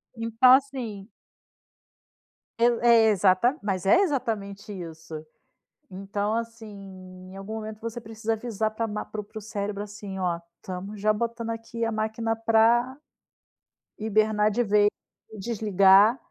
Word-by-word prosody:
Então, 230 Hz, +2 st, +4 dB
assim 245 Hz, -7 st, -1 dB, 1.5 s
Poi 235 Hz, 0 st, +3 dB
é 230 Hz, -2 st, +6 dB
exa 190 Hz, -2 st, +4 dB, 0.3 s
mas 195 Hz, -2 st, -2 dB
é 200 Hz, -, +5 dB
exatamente 215 Hz, -, -2 dB
isso. 160 Hz, -3 st, -8 dB, 0.6 s
Então, 200 Hz, +2 st, -3 dB
assim, 230 Hz, -1 st, -4 dB, 0.6 s
em -, -, -11 dB
algum 200 Hz, +3 st, -6 dB
momento 215 Hz, -1 st, -7 dB
você 230 Hz, +1 st, -6 dB
precisa 225 Hz, 0 st, -3 dB
avisar 220 Hz, -1 st, -2 dB
pra 225 Hz, +1 st, -2 dB
a -, -, -4 dB
ma 210 Hz, 0 st, -4 dB
para 215 Hz, -, -6 dB
o -, -, -12 dB
para 210 Hz, -, -12 dB
o -, -, -5 dB
cérebro, 205 Hz, -1 st, -4 dB
assim: 205 Hz, -2 st, -8 dB
"Ó, 175 Hz, -2 st, -1 dB, 0.2 s
estamos 195 Hz, +3 st, -7 dB
já 215 Hz, +1 st, +2 dB
botando 230 Hz, +1 st, -3 dB
aqui 230 Hz, 0 st, -4 dB
a 225 Hz, -, -1 dB
máquina 220 Hz, +1 st, -2 dB
pra 230 Hz, +3 st, +3 dB, 1.0 s
hibernar 215 Hz, 0 st, +2 dB
de 240 Hz, +4 st, +1 dB
vez 205 Hz, -1 st, +4 dB, 0.4 s
e 215 Hz, -, -10 dB
desligar" 205 Hz, 0 st, +4 dB
215 Hz, 145 wpm, -26 LUFS, 200-230 Hz, 1.5 s, é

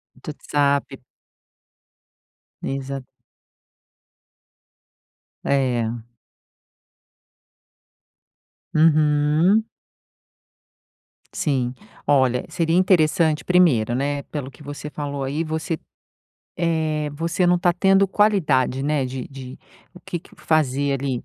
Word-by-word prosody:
Do 130 Hz, +4 st, -8 dB
WhatsApp. 140 Hz, -2 st, 0 dB, 1.6 s
Exa 135 Hz, 0 st, -4 dB, 2.4 s
É. 120 Hz, -4 st, 0 dB, 2.7 s
Uhum. 155 Hz, +6 st, +3 dB, 1.7 s
Sim. 130 Hz, -4 st, -1 dB, 0.3 s
Olha, 130 Hz, -3 st, +2 dB
seria 165 Hz, 0 st, 0 dB
interessante 165 Hz, -4 st, +3 dB
primeiro, 155 Hz, -12 st, +3 dB
né, 140 Hz, +2 st, -1 dB
pelo 145 Hz, -4 st, -6 dB
que 150 Hz, -, -16 dB
você 145 Hz, +1 st, -7 dB
falou 145 Hz, -2 st, -4 dB
aí, 145 Hz, +5 st, -2 dB
você, 160 Hz, +1 st, -3 dB, 0.8 s
eh, 160 Hz, -3 st, 0 dB
você 165 Hz, +5 st, -1 dB
não 175 Hz, 0 st, +4 dB
tá 175 Hz, 0 st, +2 dB
tendo 195 Hz, +2 st, +3 dB
qualidade, 155 Hz, -, +2 dB
né, 145 Hz, -1 st, 0 dB
de 130 Hz, -1 st, -6 dB
de 130 Hz, -1 st, -10 dB, 0.4 s
o 180 Hz, -, -13 dB
que 175 Hz, -, -5 dB
que -, -, -20 dB
fazer, 145 Hz, -3 st, +1 dB
ali. 130 Hz, -3 st, -3 dB
150 Hz, 90 wpm, -22 LUFS, 135-165 Hz, 2.7 s, não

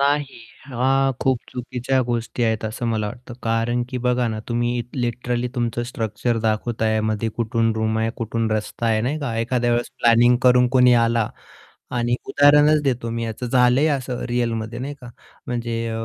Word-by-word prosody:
नाही. 140 Hz, -2 st, 0 dB, 0.3 s
हां. 135 Hz, +1 st, +1 dB
खूप 130 Hz, -2 st, +2 dB
चुकीच्या 125 Hz, +1 st, -1 dB
गोष्टी 120 Hz, 0 st, -3 dB
आहेत 110 Hz, -1 st, 0 dB
असं 110 Hz, +2 st, -3 dB
मला 110 Hz, -2 st, 0 dB
वाटतं 120 Hz, +3 st, -9 dB
कारण 115 Hz, +1 st, 0 dB
की 125 Hz, -, -4 dB
बघा 125 Hz, -1 st, +2 dB
ना 110 Hz, -1 st, -3 dB
तुम्ही 120 Hz, 0 st, 0 dB
लिटरली 125 Hz, 0 st, -2 dB
तुमचं 120 Hz, -1 st, -1 dB
स्ट्रक्चर 115 Hz, -1 st, -2 dB
दाखवताय, 110 Hz, 0 st, 0 dB
मध्ये 110 Hz, +1 st, -1 dB
कुठून 115 Hz, -1 st, +1 dB
रूम 110 Hz, 0 st, 0 dB
आहे 115 Hz, 0 st, 0 dB
कुठून 115 Hz, -1 st, -2 dB
रस्ता 110 Hz, +2 st, -2 dB
आहे 110 Hz, -1 st, +2 dB
नाही 135 Hz, +7 st, -1 dB
का 130 Hz, -7 st, -3 dB
एखाद्या 120 Hz, +1 st, 0 dB
वेळेस 120 Hz, 0 st, -1 dB
प्लॅनिंग 120 Hz, +1 st, +5 dB
करून 125 Hz, -1 st, +5 dB
कोणी 125 Hz, -1 st, +5 dB
आला 115 Hz, -1 st, +1 dB, 0.7 s
आणि 120 Hz, 0 st, +1 dB
उदाहरणच 150 Hz, +1 st, +5 dB
देतो 125 Hz, -4 st, -1 dB
मी 115 Hz, 0 st, -3 dB
याचं 115 Hz, +3 st, -5 dB
झालंय 125 Hz, +3 st, +3 dB
असं 125 Hz, -2 st, -5 dB
रिअलमध्ये 115 Hz, -1 st, -2 dB
नाही 140 Hz, +3 st, -5 dB
का 125 Hz, -, -10 dB, 0.4 s
म्हणजे 115 Hz, -1 st, -3 dB
120 Hz, 165 wpm, -22 LUFS, 115-125 Hz, 0.7 s, प्लॅनिंग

